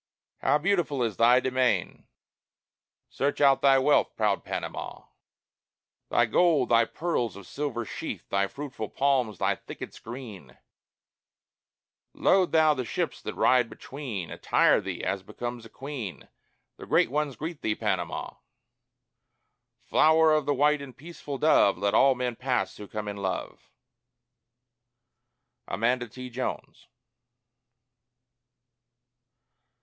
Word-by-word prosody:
IV - - -5
How - - +5
beautiful 155 -6 0
is 110 -4 -2
thy 120 +2 +6
demesne! 125 -8 0 1.0
Search 140 +1 -2
out 140 -2 +5
thy 135 -1 +6
wealth, 145 +2 +2
proud 105 -3 0
Panama: - - -6 1.0
Thy 120 - +3
gold, 150 +3 +3
thy 115 -1 +5
pearls 125 - -2
of 100 -1 -11
silver 130 -1 -4
sheen, - - -5
Thy 100 0 +2
fruitful 135 -4 -6
palms, 130 -7 +1
thy - - +1
thickets - - -9
green; 110 - -10 1.6
Load 185 -2 +3
thou 155 -1 +5
the 130 -3 -3
ships - - -3
that - - -6
ride 125 -2 +3
between; 120 - -7
Attire - - +3
thee - - -5
as 100 - -1
becomes 120 +4 -7
a - - -23
queen: 125 - -7 0.5
The - - -10
great - - +3
ones 145 -2 -1
greet 160 0 -6
thee, 110 - 0
Panama! 105 -4 -3 1.5
(Flower 160 0 +4
of 155 -2 +1
the 145 - +2
white 150 +2 +3
and 135 -3 -10
peaceful 150 -2 -7
dove, 130 - +4
Let 100 +2 0
all 135 -1 +5
men 125 -1 -2
pass 125 -6 -1
who 105 - -9
come 105 0 -5
in 100 0 -5
love.) 95 -2 -5 2.0
AMANDA 120 +6 0
T. 125 +3 -9
JONES. 125 +2 -5
125 Hz, 125 wpm, -27 LUFS, 110-145 Hz, 2.0 s, thy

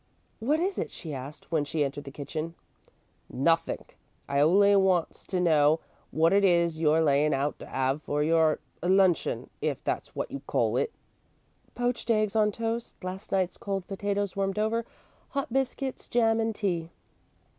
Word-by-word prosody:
"What 285 +8 +1
is 380 +3 -1
it?" - - -2
she 160 -3 -7
asked, 140 +5 -8
when 160 -3 +2
she 150 +1 -1
entered 140 +1 -5
the - - -6
kitchen. 155 +4 -5 0.7
"Nothink. 165 +5 0 0.3
I 140 0 0
only 200 +7 +5
wants 190 -4 +2
to 185 - -1
know 155 -2 +4 0.3
wot 165 +3 +3
it 200 0 +4
is 170 -3 +3
you're 160 +1 +4
layin' 145 0 +3
out 140 +2 -1
to - - -10
'ave 135 +2 0
for 150 -1 -1
your 160 0 +3 0.2
luncheon, 185 0 +2
if - - -2
that's - - -3
wot - - -3
you - - -4
call - - +1
it." - - 0 0.8
"Poached 245 -1 -1
eggs 215 -2 +2
on 210 -1 +4
toast, 230 +2 -3
last 185 +3 -6
night's 185 -2 0
cold 195 -2 -3
potatoes 200 0 -2
warmed 195 0 -1
over, 220 +2 0 0.4
hot 275 -4 -3
biscuits, 270 0 -2
jam, 225 -2 +2
and 225 -1 0
tea." 175 -6 -1
185 Hz, 165 wpm, -28 LUFS, 155-215 Hz, 0.8 s, only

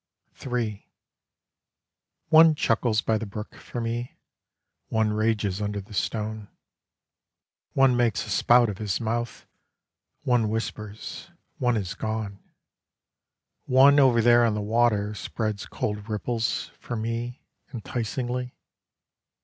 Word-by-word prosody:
III 115 -5 -3 1.4
One 160 0 +7
chuckles 115 -4 +1
by 110 -1 +1
the 110 - -5
brook 105 +2 -7
for 120 - -7
me: 120 +1 -4 0.7
One 110 -1 +1
rages 105 -2 0
under 105 0 -2
the 100 +2 -11
stone. 105 +1 -3 1.3
One 135 -2 +4
makes 115 -4 +1
a - - -7
spout 120 0 +5
of 100 -3 -5
his 105 -4 -1
mouth 120 +1 -3 0.8
One 120 -4 +2
whispers 110 - -5 0.3
one 125 -3 +2
is 95 -3 -3
gone. 110 -2 -4 1.3
One 135 +2 +6
over 125 -4 +5
there 120 0 +6
on 115 -2 +2
the - - -1
water 105 -1 +1
Spreads 105 +1 -4
cold 105 +1 -4
ripples 115 +2 -2
For 120 - -5
me 115 +2 -4 0.3
Enticingly. 125 +2 -4
110 Hz, 115 wpm, -26 LUFS, 105-120 Hz, 1.4 s, One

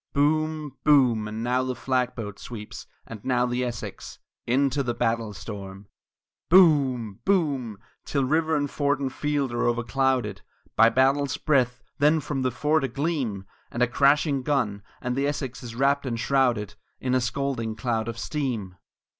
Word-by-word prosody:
Boom! 155 0 0
Boom! 125 -7 +4
and 110 +1 -5
now 125 +1 +1
the 130 0 -2
flag 125 -1 -1
boat 105 -4 -6
sweeps, 105 -3 -8 0.2
and 110 -3 -10
now 125 -1 +2
the 125 +1 -1
Essex, 120 -3 -6 0.3
Into 135 +3 +2
the 120 -3 -2
battle 115 -2 0
storm! 100 -2 -8
III 100 - -31
Boom! 130 - +3
Boom! 140 - 0 0.3
till 140 -2 0
river 160 +3 +1
and 145 -1 0
fort 145 -1 0
and 135 -2 -3
field 145 -3 -1
are 120 - 0
overclouded 120 -3 0 0.3
By 115 - +6
battle's 135 +3 +2
breath; 125 -5 +1 0.2
then 150 +3 +4
from 145 -2 -3
the 130 - +1
fort 150 +5 +1
a - - +1
gleam 130 - -2 0.2
And 120 - 0
a - - +3
crashing 140 +2 +3
gun, 125 -8 0 0.2
and 125 0 -1
the 140 +1 +1
Essex 135 -3 -4
is 120 -2 -8
wrapt 140 +2 +1
and 115 -2 -2
shrouded 120 -6 +1 0.3
In 130 -1 -1
a 130 - +3
scalding 120 -2 -2
cloud 110 -1 -1
of 115 -1 -4
steam! 115 - -3
130 Hz, 165 wpm, -25 LUFS, 115-140 Hz, 0.3 s, By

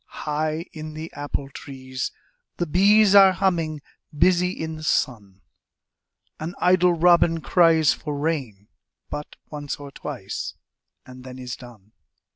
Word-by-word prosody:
High 155 +2 -2
in 155 -1 -8
the 160 +1 -7
apple 145 -1 -4
trees 130 -2 -6 0.5
the 175 - 0
bees 200 +5 +5
Are 195 -2 +8
humming, 165 -6 -1 0.3
busy 180 +2 +4
in 160 -3 -5
the - - -10
sun, 100 -10 -1 1.0
An 165 +4 -5
idle 180 0 +4
robin 170 -1 +4
cries 165 -2 +4
for 150 -2 -5
rain 135 -10 -3 0.4
But 150 - -6 0.2
once 145 -1 -4
or 145 -1 -10
twice - - -6 0.5
and 130 0 -12
then 130 0 -9
is 125 -1 -6
done. 110 -5 -15
155 Hz, 130 wpm, -23 LUFS, 135-175 Hz, 1.0 s, Are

